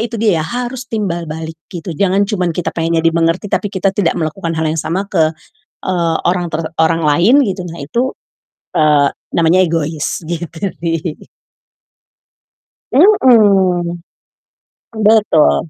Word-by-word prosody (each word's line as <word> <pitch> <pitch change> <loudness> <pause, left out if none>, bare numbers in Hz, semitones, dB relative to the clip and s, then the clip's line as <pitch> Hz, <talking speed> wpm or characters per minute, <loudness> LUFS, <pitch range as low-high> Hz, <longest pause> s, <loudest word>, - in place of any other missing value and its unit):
itu 230 0 -4
dia 205 -7 +2
ya, - - -2
harus 245 0 -4
timbal 175 -7 -3
balik 160 +1 -7
gitu, 175 -1 -6
jangan 195 +4 +1
cuman 180 -5 -2
kita 180 - -2
pengennya 165 0 -1
dimengerti 165 +4 +1
tapi 205 - 0
kita 195 0 -1
tidak 195 -4 0
melakukan 165 +1 -3
hal 160 - -1
yang 160 - -1
sama 185 +4 -2
ke, 160 -4 +3 0.6
eee, 170 -3 0
orang 175 0 0
ter 165 0 -3 0.2
orang 165 +1 +2
lain 180 - +4
gitu 190 -5 -3
nah 165 - -8
itu, 240 - -2 0.6
eee, 150 -2 +4 0.2
namanya 170 +3 +3
egois, 160 -3 -2
gitu 170 -1 -5 0.2
sih. 165 -1 -3 1.7
Mhm, 200 - +4 1.1
betul. 155 - +3
170 Hz, 135 wpm, -15 LUFS, 160-200 Hz, 1.7 s, lain